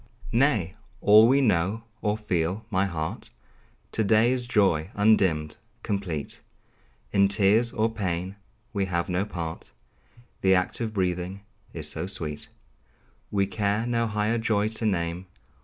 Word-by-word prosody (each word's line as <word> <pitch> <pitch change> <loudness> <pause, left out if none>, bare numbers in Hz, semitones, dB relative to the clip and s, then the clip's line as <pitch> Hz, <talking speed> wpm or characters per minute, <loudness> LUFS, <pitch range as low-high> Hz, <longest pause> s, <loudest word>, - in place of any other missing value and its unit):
Nay! 115 - +2 0.3
all 105 +2 +7
we 135 +3 +4
know, 105 -1 +1 0.2
or 105 0 0
feel, 95 0 -2
my 95 0 +2
heart, 80 -3 -5 0.6
To 110 - 0
day 110 +3 +4
is 125 -1 -1
joy 95 -8 +2
undimmed, 95 -7 +2 0.3
complete; 95 -9 -4 0.7
In 100 0 +4
tears 105 +4 +3
or 110 0 +1
pain 95 -4 -3 0.4
we 100 -2 0
have 85 -1 -2
no 90 +2 0
part; 85 -8 -6 0.7
The 95 0 +4
act 90 +4 -1
of 115 -2 -2
breathing 90 -1 -2 0.3
is - - -4
so 90 - -3
sweet, 80 -6 -5 0.8
We 100 -1 +1
care 100 +3 -1
no 115 -1 0
higher 105 +2 0
joy 110 -2 +1
to 110 0 0
name. 85 -1 -2
100 Hz, 140 wpm, -26 LUFS, 90-110 Hz, 0.8 s, all